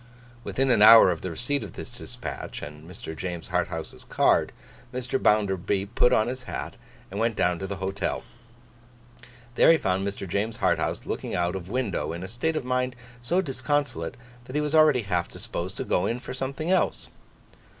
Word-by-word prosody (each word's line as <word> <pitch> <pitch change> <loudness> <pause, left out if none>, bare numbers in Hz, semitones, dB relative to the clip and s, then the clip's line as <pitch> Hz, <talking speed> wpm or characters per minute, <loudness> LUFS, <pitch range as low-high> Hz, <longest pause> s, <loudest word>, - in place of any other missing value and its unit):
Within 135 0 +1
an 115 -4 +4
hour 110 -3 +10
of 85 - -4
the 95 - -3
receipt 125 - -1
of 105 - -8
this - - -8
dispatch - - -7
and 75 +2 -9
Mr. 90 -4 -8
James 85 -1 -5
Harthouse's - - -3
card, - - +2 0.4
Mr. 125 +1 -2
Bounderby 100 -2 +2
put 125 - +4
on 110 - +3
his 130 +1 -4
hat - - -5 0.4
and 100 - -4
went 115 0 +1
down 90 -2 +1
to 95 - -4
the 100 - -4
Hotel. 95 +1 -2 1.3
There - - +5
he 165 - +6
found 95 -5 0
Mr. 100 -1 -5
James 105 +5 -1
Harthouse - - 0
looking - - -3
out 90 +1 0
of 95 -1 -6
window, 100 - -1
in 85 +2 -6
a - - -5
state 125 +10 -2
of 155 - -2
mind 125 0 0 0.3
so 175 +10 +1
disconsolate, 140 - -1 0.3
that 130 - -9
he 150 - +2
was 150 0 -2
already 155 -6 +5
half 90 -3 0
disposed 90 +3 -5
to - - -2
'go 90 - +1
in' 120 - -1
for 125 - -7
something 135 +6 -3
else. 190 - +1
110 Hz, 185 wpm, -26 LUFS, 95-130 Hz, 1.3 s, hour